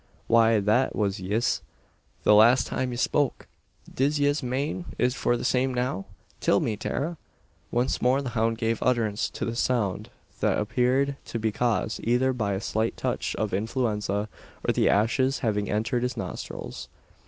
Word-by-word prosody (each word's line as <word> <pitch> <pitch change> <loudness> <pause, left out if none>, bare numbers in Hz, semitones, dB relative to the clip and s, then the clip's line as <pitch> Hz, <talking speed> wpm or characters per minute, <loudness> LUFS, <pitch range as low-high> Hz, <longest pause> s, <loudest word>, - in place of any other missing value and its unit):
"Why, 115 -1 +4
that 110 +6 +2
was 100 -1 0
yis, 105 +6 0 0.6
the - - +5
last 115 +5 +6
time 130 -1 -2
ye 120 - -4
spoke! 140 +2 0 0.5
Div 145 +3 +1
yez 145 +1 +2
mane 140 +7 -2
is 125 0 +2
for 120 -2 +1
the - - -5
same 130 0 +1
now? 125 -6 -1 0.3
Till - - +3
me, 110 - -1
Tara!" 160 +10 -3 0.5
Once 120 +2 0
more 130 +2 +3
the 130 - -3
hound 115 -1 0
gave 115 0 -1
utterance 115 -4 +1
to - - -4
the 115 - -3
sound 115 -6 0 0.3
that - - +2
appeared 125 +6 +1
to - - -4
be 110 -1 0
caused 115 -1 0
either 125 +3 +2
by 105 -5 -1
a 95 - -1
slight 110 +1 -1
touch - - -2
of 110 -3 -2
influenza, 105 -1 -1 0.4
or - - +3
the - - +3
ashes 130 +6 +2
having 105 -2 0
entered 115 +4 0
his 125 +1 -2
nostrils. - - -6
120 Hz, 165 wpm, -26 LUFS, 110-130 Hz, 0.6 s, last